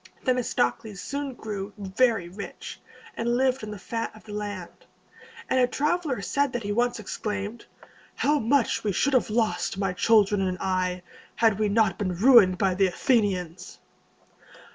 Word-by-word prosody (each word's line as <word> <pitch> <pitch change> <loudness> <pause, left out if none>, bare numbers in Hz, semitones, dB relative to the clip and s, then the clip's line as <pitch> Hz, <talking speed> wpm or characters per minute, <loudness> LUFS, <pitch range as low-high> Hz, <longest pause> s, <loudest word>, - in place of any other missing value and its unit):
Themistocles 215 - 0
soon 280 -2 -4
grew 205 -3 -6
very 205 0 +1
rich, 195 +4 -9 0.3
and 235 +1 0
lived 260 -1 +1
on 215 - -5
the 210 - -6
fat 225 +4 -4
of 215 - -15
the 210 - -10
land; 205 -4 -6 0.6
and 260 - +1
a 250 - +4
traveler 295 - -1
said 280 +2 0
that 240 -2 -3
he 205 - -3
once 240 +2 0
exclaimed, 210 +1 -5 0.5
"How 295 +1 +2
much 250 +1 +1
we 205 -2 0
should 280 +10 +1
have 255 - +2
lost, 220 -3 0
my 195 -2 -1
children 205 0 +3
and 185 -1 -1
I, 185 -1 -1 0.3
had 220 -3 +2
we 215 -1 +1
not 205 -3 +2
been 185 -4 -1
ruined 205 -3 +6
by 190 -1 +1
the 190 +1 +3
Athenians!" 185 -4 -1
210 Hz, 160 wpm, -26 LUFS, 195-245 Hz, 0.6 s, ruined